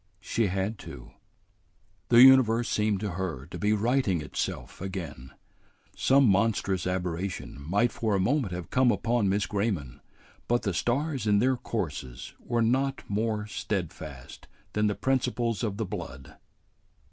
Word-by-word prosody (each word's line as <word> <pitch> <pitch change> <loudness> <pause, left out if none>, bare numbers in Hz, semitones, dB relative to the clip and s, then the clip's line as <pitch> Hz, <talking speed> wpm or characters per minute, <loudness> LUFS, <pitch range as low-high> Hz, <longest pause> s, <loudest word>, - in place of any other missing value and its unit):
"She 110 +2 0
had 95 +3 -2
to." - - -10 1.0
The 120 +1 +8
universe 120 -3 +6
seemed 105 -2 +1
to 105 -3 -2
her 85 -7 -4
to 85 - -8
be 105 +1 +1
righting 110 -3 +1
itself 75 - -5
again. 85 -9 -6 0.7
Some 135 +1 +4
monstrous 100 -3 +1
aberration 90 -4 -3
might 100 +11 +1
for 110 -3 -1
a - - +1
moment 120 +1 +1
have 90 -1 -6
come 130 -1 +4
upon 115 -3 +1
Miss 100 +1 +1
Grayman, 100 - -2 0.5
but 120 0 +1
the 100 - -1
stars 130 - -1
in 105 -1 +4
their 130 +5 +3
courses 75 - -5
were 120 -1 0
not 135 +4 +1
more 105 0 -1
steadfast 80 -10 -5 0.3
than 105 0 +2
the 105 - 0
principles 125 -4 0
of 105 -4 -2
the 110 - -1
blood. 70 -9 -7
105 Hz, 145 wpm, -28 LUFS, 90-120 Hz, 1.0 s, The